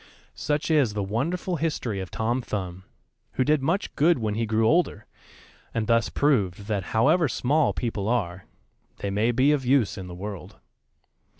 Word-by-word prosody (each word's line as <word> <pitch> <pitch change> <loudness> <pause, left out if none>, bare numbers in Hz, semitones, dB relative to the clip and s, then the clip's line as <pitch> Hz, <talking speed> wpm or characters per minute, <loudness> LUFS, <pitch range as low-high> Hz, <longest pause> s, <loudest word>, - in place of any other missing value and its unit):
Such 150 +2 -1
is 135 -9 +3
the 105 - -1
wonderful 170 - -2
history 140 -10 -2
of 95 -1 -5
Tom 120 +3 -1
Thumb, 95 -5 -5 0.5
who 130 - +1
did 150 +1 +2
much 170 +9 -1
good 165 +2 +4
when 110 -3 -2
he 115 +1 -1
grew 110 +1 +2
older, 160 - +1 0.7
and 115 -2 0
thus 115 0 +2
proved 105 -10 +1
that 100 -3 -2
however 145 +9 +3
small 140 +5 +1
people 110 -4 -3
are, 95 -7 -1 0.5
they 100 - -3
may 105 +4 +1
be 130 +4 +3
of 145 -3 +1
use 120 -6 +2
in 95 - -7
the 90 - -8
world. 100 +1 -7
115 Hz, 170 wpm, -25 LUFS, 100-145 Hz, 0.7 s, good